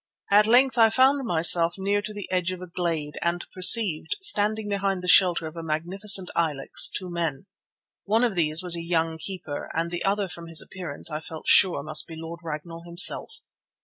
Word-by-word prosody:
At 210 +1 +4
length 255 +2 +3
I 225 -1 +6
found 265 +2 +2
myself 170 -1 +3
near 200 +1 -1
to 210 +1 -8
the 205 -2 -8
edge 185 -1 -1
of 185 - -7
a 185 - -9
glade, 165 -4 -4
and 170 0 -2
perceived, 190 - +4
standing 215 - +1
behind 195 -2 -3
the - - -6
shelter 180 -3 +4
of 155 +1 -9
a 165 - -7
magnificent 180 +5 +1
ilex, 150 -5 +1
two 185 - -6
men. 165 -4 -4 0.6
One 220 +4 +1
of 240 -4 0
these 160 -1 +1
was 175 -1 +1
a 170 - -5
young 165 -1 -2
keeper, 160 -4 -7
and 165 +1 -3
the 175 0 -4
other, 200 0 -1
from 170 -1 -11
his 165 -1 +3
appearance, 165 -4 -5
I 155 - -4
felt 160 0 -11
sure 180 -7 +4
must 155 +1 0
be 165 - -10
Lord 165 +1 -9
Ragnall 165 +1 -8
himself. 175 +2 +3
175 Hz, 195 wpm, -24 LUFS, 165-200 Hz, 0.6 s, I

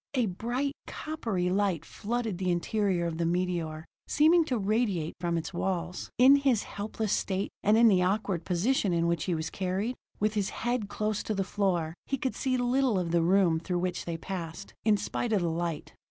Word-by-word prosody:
A 250 -3 +3
bright, 240 +8 -2
coppery 225 - -2
light 195 -4 +1
flooded 225 -3 -3
the 185 -1 0
interior 180 0 +1
of 165 -1 -3
the - - +1
meteor, 170 -3 -1 0.2
seeming 325 +3 +5
to 255 -5 0
radiate 205 -6 0
from 170 -1 0
its 165 - -4
walls. 175 0 -2
In 265 +3 +8
his 270 -6 +2
helpless 210 0 -3
state, 195 0 -1
and 210 +2 +4
in 230 0 +7
the 190 -4 +5
awkward 185 -2 0
position 195 +2 +1
in 170 0 +2
which 170 -2 0
he 180 - 0
was 160 0 -3
carried, 195 +6 -2 0.2
with 215 +1 +1
his 205 -3 0 0.2
head 240 -4 0
close 215 0 -1
to 215 - -3
the 195 - 0
floor, 180 -5 0
he 275 - 0
could 260 0 -2
see 260 -1 0
little 250 -2 +2
of 175 -2 -1
the 170 0 +3
room 175 -1 +3
through 175 +2 -2
which 180 0 -2
they 170 -1 -3
passed, 170 +1 -6
in 215 -1 +4
spite 230 +3 -2
of 195 -4 +2
the 170 - 0
light. 165 -1 -3
195 Hz, 195 wpm, -29 LUFS, 175-225 Hz, 0.2 s, In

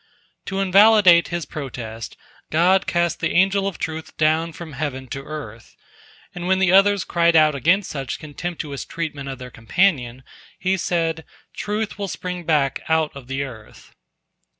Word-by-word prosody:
To 195 0 -2
invalidate 195 -2 +6
his 175 -2 -3
protest, 115 -7 -7 0.3
God 185 +5 +3
cast 175 -1 0
the - - -1
Angel 195 +2 +3
of 195 - -4
Truth 160 0 -6
down 160 +2 +2
from 165 -1 -9
heaven 130 -1 -4
to 135 +2 -5
earth, 130 -7 -9 0.6
and 175 0 -5
when 190 0 +3
the 190 -2 +3
others 195 0 +5
cried 170 -1 +2
out 155 -1 +5
against 175 +8 +1
such 135 -3 -4
contemptuous 155 -2 -6
treatment 150 -4 -5
of 135 - -5
their 125 0 -9
companion, 130 - 0 0.3
He 190 +1 0
said, 165 -3 -1 0.3
"Truth 210 0 -3
will 200 - -2
spring 180 -2 -5
back 145 -4 +1
out 160 -2 +1
of 135 -3 -10
the 135 +1 -2
earth." 115 -6 -12
165 Hz, 155 wpm, -22 LUFS, 140-185 Hz, 0.6 s, invalidate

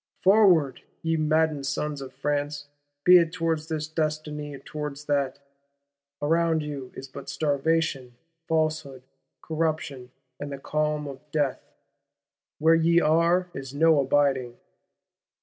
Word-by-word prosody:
Forward, 185 - +4 0.2
ye 165 0 +1
maddened 155 -2 +1
sons 150 0 -2
of 135 - -8
France; 145 0 -2 0.4
be 180 +2 +8
it 165 -1 0
towards 165 -2 -1
this 155 -2 -3
destiny 155 -2 -3
or - - -8
towards 150 +1 -7
that! 140 -2 0 0.9
Around 165 +1 +2
you 140 -4 -6
is 135 - -8
but 135 +1 -9
starvation, 145 -4 0 0.3
falsehood, 155 -5 -1 0.4
corruption 155 -5 -2 0.3
and 145 0 -6
the 140 - -5
clam 150 +1 -1
of 140 -2 -7
death. 145 -3 0 1.0
Where 160 +2 +4
ye 165 +1 +4
are 170 +3 +2
is 135 0 -7
no 160 0 +4
abiding. 135 -3 +1
150 Hz, 125 wpm, -26 LUFS, 140-160 Hz, 1.0 s, be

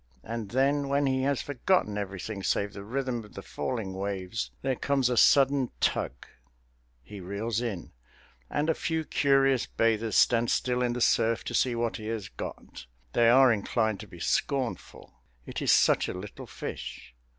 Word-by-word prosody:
And 115 -2 -5
then, 140 +3 +1
when 140 +1 +2
he 130 -1 +1
has 140 -2 0
forgotten 145 - +1
everything 100 0 -5
save 100 +1 0
the 100 - -8
rhythm 125 +1 -3
of 105 - -16
the 95 - -7
falling 115 -7 -4
waves, 95 +2 -3
there 135 -1 0
comes 135 -1 +1
a - - +1
sudden 135 +1 +4
tug 65 - -1 0.8
He 105 +6 -10
reels 100 +5 -3
in, 105 -9 -4 0.6
and 150 +1 -1
a 160 - +3
few 160 +1 -2
curious 135 -3 +2
bathers 115 -2 0
stand 120 -1 +4
still 125 -1 0
in 120 -1 +1
the 125 - -4
surf 115 0 +2
to - - -5
see 125 -2 +2
what 115 -1 -1
he 110 - -7
has 110 -3 -4
got. 60 - -8 0.3
They 115 -1 +5
are 130 0 +6
inclined 110 0 -1
to - - -9
be - - -13
scornful. 130 -4 -2 0.2
It - - -5
is - - +3
such - - +4
a - - -4
little 95 +2 -8
fish! 60 - -7
115 Hz, 175 wpm, -28 LUFS, 105-135 Hz, 0.8 s, are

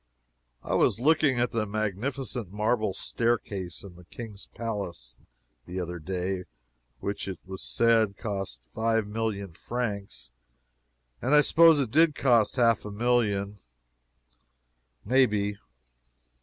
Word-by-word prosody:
I - - -3
was - - +3
looking 145 -2 +3
at 120 0 0
a 110 -2 0
magnificent 110 +2 -3
marble 110 +1 0
staircase 105 -7 -2
in 100 -3 -10
the 90 - -15
King's 105 +1 -8
palace, 90 - -5 0.5
the 90 +1 -4
other 90 -1 -4
day, 90 +2 -3 0.6
which, 100 0 -3
it 95 - -4
was 95 0 -7
said, 115 -3 +2
cost 95 - -5
five 110 +3 0
million 105 -3 -3
francs, 105 - -4 0.9
and 130 +5 +3
I 150 - +8
suppose 165 0 +6
it 130 -6 -1
did 160 +1 +4
cost 120 -5 +3
half 115 -4 +3
a 105 - -6
million, 105 -3 0 1.5
may 130 +4 +5
be. 100 -1 -2
105 Hz, 125 wpm, -27 LUFS, 100-120 Hz, 1.5 s, I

